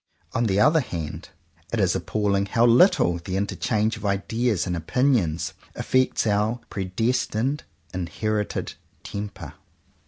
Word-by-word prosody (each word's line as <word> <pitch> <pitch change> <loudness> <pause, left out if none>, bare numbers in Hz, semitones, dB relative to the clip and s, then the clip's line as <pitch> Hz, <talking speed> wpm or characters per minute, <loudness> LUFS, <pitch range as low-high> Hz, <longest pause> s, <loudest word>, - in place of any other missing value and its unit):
On 120 - +1
the 100 0 +2
other 150 +9 +5
hand, 85 - -5 0.4
it - - -1
is - - +2
appalling 100 -2 0
how 115 +3 +3
little 115 - +5
the 90 +2 -3
interchange 105 +2 0
of 105 - -11
ideas 100 0 0
and 90 -2 -2
opinions 85 - +1 0.2
affects 130 -2 +1
our 105 +3 +1
predestined, 115 +7 -1 0.3
inherited 105 +4 -2 0.3
temper. 100 0 -6
105 Hz, 120 wpm, -24 LUFS, 95-120 Hz, 0.4 s, other